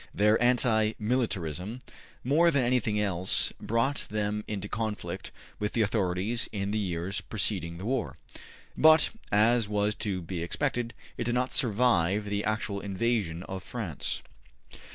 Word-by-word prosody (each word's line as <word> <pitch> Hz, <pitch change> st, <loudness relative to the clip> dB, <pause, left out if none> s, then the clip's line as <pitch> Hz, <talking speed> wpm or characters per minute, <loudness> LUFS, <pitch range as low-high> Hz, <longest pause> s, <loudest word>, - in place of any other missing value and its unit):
Their 105 Hz, +3 st, +4 dB
anti 115 Hz, -3 st, +3 dB
militarism, 105 Hz, -, -1 dB, 0.5 s
more 155 Hz, +7 st, +4 dB
than 140 Hz, -5 st, +2 dB
anything 120 Hz, -4 st, +1 dB
else, 95 Hz, -3 st, 0 dB
brought 125 Hz, +6 st, 0 dB
them 105 Hz, 0 st, -1 dB
into 105 Hz, -1 st, -4 dB
conflict 105 Hz, -5 st, -4 dB, 0.3 s
with 105 Hz, 0 st, -2 dB
the 115 Hz, -, +3 dB
authorities 105 Hz, +3 st, 0 dB
in 100 Hz, -1 st, -2 dB
the 110 Hz, -, 0 dB
years 90 Hz, -1 st, -2 dB
preceding 90 Hz, -5 st, -2 dB
the 95 Hz, -, -7 dB
war. 130 Hz, +1 st, -1 dB, 0.6 s
But, 160 Hz, 0 st, +6 dB, 0.2 s
as 110 Hz, +1 st, +4 dB
was 105 Hz, 0 st, +1 dB
to 95 Hz, -4 st, -1 dB
be 85 Hz, +1 st, -4 dB
expected, 120 Hz, -, -1 dB, 0.2 s
it 115 Hz, -, -1 dB
did 120 Hz, +1 st, 0 dB
not 125 Hz, +1 st, 0 dB
survive 105 Hz, -, +3 dB
the 105 Hz, 0 st, -1 dB
actual 110 Hz, -2 st, -1 dB
invasion 100 Hz, -4 st, -1 dB
of 95 Hz, 0 st, -6 dB
France. 105 Hz, -, -4 dB
105 Hz, 140 wpm, -29 LUFS, 95-120 Hz, 0.6 s, But